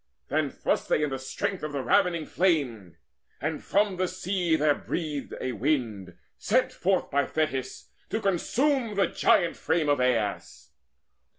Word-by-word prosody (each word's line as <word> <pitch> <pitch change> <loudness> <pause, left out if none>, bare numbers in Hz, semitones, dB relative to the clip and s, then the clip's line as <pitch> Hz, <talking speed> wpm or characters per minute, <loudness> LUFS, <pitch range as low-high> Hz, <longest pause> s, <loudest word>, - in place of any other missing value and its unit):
Then 150 0 +1
thrust - - -1
they 150 - +2
in 150 - -1
the 135 - -3
strength 180 +8 -3
of 150 -1 -4
ravening 155 +5 +2
flame, 135 - 0 0.4
And 155 +3 -3
from 200 -2 +1
the 185 0 +1
sea 180 -2 0
there 150 -1 +3
breathed 150 -2 -4
a 130 - -2
wind, 115 -7 -2 0.2
sent 255 +5 +1
forth 185 0 0
By 140 -1 +2
Thetis, 150 -5 -3 0.2
to 220 - -1
consume 230 - +1
the 200 - +3
giant 175 -3 +2
frame 160 -3 0
Of 145 - +3
Aias. 115 -5 -1
155 Hz, 150 wpm, -27 LUFS, 135-185 Hz, 0.4 s, there